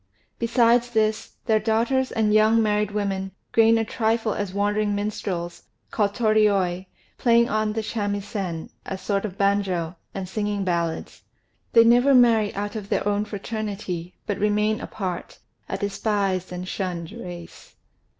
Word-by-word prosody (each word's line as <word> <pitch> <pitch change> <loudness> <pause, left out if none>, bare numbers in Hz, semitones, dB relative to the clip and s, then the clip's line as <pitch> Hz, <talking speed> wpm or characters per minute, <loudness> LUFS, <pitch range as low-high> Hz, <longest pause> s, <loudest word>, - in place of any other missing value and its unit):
Besides 235 0 +3
this, 220 -2 0
their 220 -2 +3
daughters 230 +5 +1
and 215 -3 +1
young 215 +1 +5
married 210 -1 +1
women 195 -2 -2 0.2
gain 225 0 +5
a 225 - 0
trifle 225 -1 0
as 205 -2 -3
wandering 205 +1 0
minstrels, 195 -4 -3 0.3
called 205 -2 0
Torioi, 200 -5 +2 0.3
playing 235 -1 +4
on 215 0 0
the 220 0 -2
shamisen, 205 -5 -3
a 190 - -5
sort 200 +1 -1
of 195 -2 -6
banjo, 195 -4 0 0.2
and 190 -1 -4
singing 205 0 -2
ballads. 170 -3 -2 0.5
They 230 - +8
never 245 +4 +5
marry 230 -4 +5
out 205 +1 -3
of 205 -2 -6
their - - 0
own 205 0 +1
fraternity, 200 -4 -5
but 205 - -2
remain 210 +1 +1
apart, 185 -4 -5 0.3
a 195 - -2
despised 200 -2 -1
and 180 0 -5
shunned 180 -3 -4
race. 180 -7 -10
205 Hz, 140 wpm, -24 LUFS, 195-220 Hz, 0.5 s, They